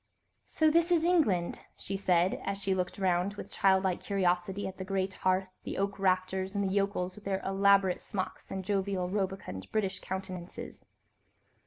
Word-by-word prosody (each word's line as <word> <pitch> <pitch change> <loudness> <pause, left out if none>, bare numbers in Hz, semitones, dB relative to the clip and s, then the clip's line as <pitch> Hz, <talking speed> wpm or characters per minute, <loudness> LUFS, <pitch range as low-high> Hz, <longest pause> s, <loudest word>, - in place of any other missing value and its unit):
"So 315 -1 +3
this 335 +2 +3
is 335 -2 +4
England," 255 - +2 0.2
she 195 - -4
said, 180 -2 +2
as 200 0 -2
she 195 -1 0
looked 180 -1 -2
round 190 +1 +1
with - - -8
childlike 190 -2 +2
curiosity 190 0 0
at 190 0 -8
the - - -3
great 190 0 -1
open - - -21
hearth, 185 0 +2
the - - -5
oak 200 0 -1
rafters, 190 +1 0
and 200 - +1
the 190 - -1
yokels 195 -2 0
with 210 - -13
their 195 -1 0
elaborate 195 -1 +4
smocks 190 -2 -4
and 190 -1 -4
jovial, 195 -2 0
rubicund, 190 - -3
British 195 -3 0
countenances. 185 -2 -6
190 Hz, 170 wpm, -31 LUFS, 185-200 Hz, 0.2 s, is